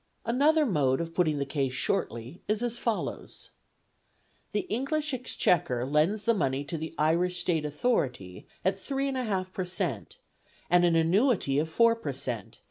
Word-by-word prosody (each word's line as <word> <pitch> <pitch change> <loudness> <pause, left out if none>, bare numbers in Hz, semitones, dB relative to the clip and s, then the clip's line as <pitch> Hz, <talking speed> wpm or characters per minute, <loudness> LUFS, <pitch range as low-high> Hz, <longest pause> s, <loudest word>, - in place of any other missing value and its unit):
Another 295 +7 +3
mode 140 - +2
of 165 0 -4
putting 160 -4 +1
the 140 - -1
case 135 -2 -1
shortly 125 +3 -2
is 215 +2 0
as 240 0 -1
follows: 230 -3 -4 1.0
The 210 - 0
English 290 +5 -2
Exchequer 170 - +1
lends 155 +10 +1
the 230 - +3
money 135 -8 0
to 145 +3 -5
the 160 +1 -6
Irish 175 +4 +1
State 165 -3 0
Authority 135 - -2 0.2
at 190 +1 +1
3 275 +5 -2
1/8 205 -8 -2
per 190 - -2
cent. 175 - -3 0.5
and 175 0 +5
an 170 -1 +3
annuity 165 - +3
of 160 +2 -1
4 230 +7 +4
per 155 -12 -4
cent. 125 -6 -4
175 Hz, 155 wpm, -28 LUFS, 145-230 Hz, 1.0 s, and